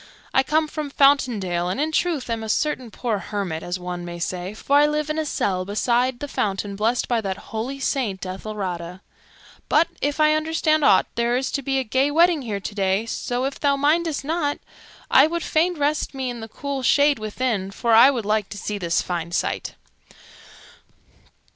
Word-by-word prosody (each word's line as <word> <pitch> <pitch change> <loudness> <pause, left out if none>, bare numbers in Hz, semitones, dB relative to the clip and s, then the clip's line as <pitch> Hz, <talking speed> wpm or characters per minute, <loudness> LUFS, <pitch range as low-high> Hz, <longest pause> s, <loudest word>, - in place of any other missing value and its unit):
I 265 - +5
come 310 +3 +1
from 300 -1 -5
Fountain 275 -5 +3
Dale 175 -2 -1
and, 185 - -2
in 310 +2 0
truth, 315 -4 0
am 230 -1 -2
a 220 - -5
certain 260 -1 -1
poor 220 -2 -2
hermit, 190 -6 -4
as 175 +1 -3
one 180 -1 -5
may 175 0 -6
say, 180 +3 -4
for 280 +6 +2
I 295 +1 +6
live 300 0 -1
in 310 - -2
a 310 - -2
cell 185 -8 -1
beside 240 +5 +1
the 290 - -5
fountain 200 -5 -2
blessed 225 +4 0
by 235 -2 +1
that 195 -2 -3 0.2
holy 250 +5 -3
Saint 220 -10 -1
Ethelrada. 185 -2 -5 0.7
But, 320 +3 +4
if 290 +2 -1
I 305 0 +5
understand 310 0 +1
aught, - - +5
there 235 +1 +1
is 265 - -2
to 280 - -1
be 270 0 -1
a 265 - +1
gay 260 +4 +1
wedding 330 +1 +4
here 215 -5 -3
today; 195 +1 -1
so, 245 +2 -2
if 275 - -4
thou 280 -1 +2
mindest 300 +1 +1
not, 300 -2 -1 0.5
I - - +7
would 340 0 -3
fain 340 +2 +1
rest 295 0 -1
me 260 -2 -2
in 240 - -7
the 225 - -7
cool 280 +3 -4
shade 285 +2 +3
within, 215 -2 -2
for 230 +4 -2
I 235 +4 +8
would 240 -6 -2
like 210 -1 0
to 205 - -7
see 205 +1 -4
this 170 -2 0
fine 170 -2 -4
sight." - - -2
245 Hz, 195 wpm, -23 LUFS, 200-290 Hz, 0.7 s, I